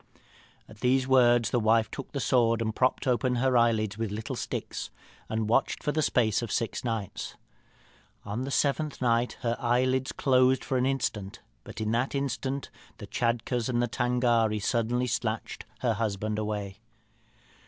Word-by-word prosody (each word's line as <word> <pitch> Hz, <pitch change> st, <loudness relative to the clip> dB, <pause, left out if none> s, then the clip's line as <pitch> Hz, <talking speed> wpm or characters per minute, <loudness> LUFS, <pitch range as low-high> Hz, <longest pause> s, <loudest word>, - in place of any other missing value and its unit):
"At 110 Hz, -, -15 dB
these 130 Hz, +2 st, +2 dB
words 120 Hz, -3 st, +4 dB
the 120 Hz, -, +2 dB
wife 110 Hz, 0 st, +3 dB
took 135 Hz, -, -7 dB
the 140 Hz, -, -3 dB
sword, 115 Hz, -3 st, +2 dB
propped 130 Hz, 0 st, +1 dB
open 125 Hz, 0 st, +1 dB
her 130 Hz, +1 st, +2 dB
eyelids 110 Hz, -3 st, +2 dB
with 115 Hz, -2 st, -1 dB
little 105 Hz, +2 st, -4 dB
sticks, -, -, -4 dB, 0.4 s
and 110 Hz, -1 st, -1 dB
watched 115 Hz, -, +1 dB
for 150 Hz, -, +1 dB
the 155 Hz, -, 0 dB
space 115 Hz, -7 st, +2 dB
of 115 Hz, -3 st, -5 dB
six 115 Hz, -3 st, -2 dB
nights. 115 Hz, -5 st, -4 dB, 0.9 s
On 105 Hz, +4 st, -3 dB
the 135 Hz, -, -3 dB
seventh 145 Hz, +2 st, 0 dB
night 120 Hz, -1 st, +1 dB
her 120 Hz, -1 st, 0 dB
eyelids 130 Hz, +2 st, +1 dB
closed 130 Hz, -1 st, +3 dB
for 135 Hz, -, -1 dB
an 125 Hz, -, +2 dB
instant, 110 Hz, -7 st, -2 dB, 0.2 s
but -, -, -9 dB
in 110 Hz, 0 st, -1 dB
that 120 Hz, +5 st, 0 dB
instant 140 Hz, 0 st, -2 dB, 0.3 s
the -, -, -8 dB
Tschadkurrs 120 Hz, 0 st, -1 dB
and 120 Hz, -1 st, 0 dB
Tângâri 120 Hz, -3 st, +1 dB
suddenly 120 Hz, +3 st, 0 dB
snatched 115 Hz, -2 st, -3 dB, 0.2 s
her 120 Hz, -3 st, +2 dB
husband 105 Hz, 0 st, -2 dB
away. 105 Hz, -2 st, -4 dB
120 Hz, 155 wpm, -28 LUFS, 110-130 Hz, 0.9 s, words